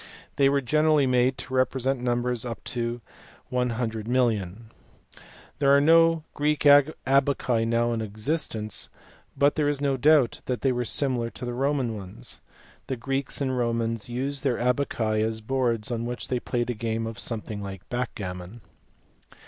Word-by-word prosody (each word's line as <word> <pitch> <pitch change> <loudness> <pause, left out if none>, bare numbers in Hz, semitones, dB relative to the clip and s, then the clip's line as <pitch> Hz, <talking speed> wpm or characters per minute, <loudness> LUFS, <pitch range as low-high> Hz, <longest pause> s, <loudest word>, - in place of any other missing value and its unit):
They 135 -1 +5
were 140 0 +2
generally 150 +2 +3
made 125 0 +2
to 130 - -7
represent 130 0 +1
numbers 120 -1 0
up 120 -2 -6
to 120 0 -3 0.5
100,000000. 115 -4 0 1.0
There 140 0 +5
are - - +5
no 165 +1 +5
Greek 150 +1 0
abaci 140 -4 +3
now 120 +1 +1
in 115 - -2
existence 110 0 -3 0.5
but 145 +1 +4
there 150 -2 +1
is 145 -2 -1
no 140 -2 0
doubt 145 -2 +4
that 125 -2 -2
they 135 - +2
were 125 -1 -1
similar 125 -3 0
to 125 - -8
the 120 - -3
Roman 135 -2 0
ones. 95 - -9 0.5
The 130 - -2
Greeks 135 +4 -2
and 130 -2 0
Romans 115 -2 -1
used 135 +3 -2
their 130 -4 +1
abaci 120 -4 0
as 110 0 -2
boards 120 -1 -1
on 115 0 -2
which 120 0 -5
they 125 - 0
played 120 0 -2
a - - -2
game 115 0 -3
something 110 -3 -5
like 95 -2 -8
backgammon. 100 -4 -5
125 Hz, 150 wpm, -26 LUFS, 115-135 Hz, 1.0 s, They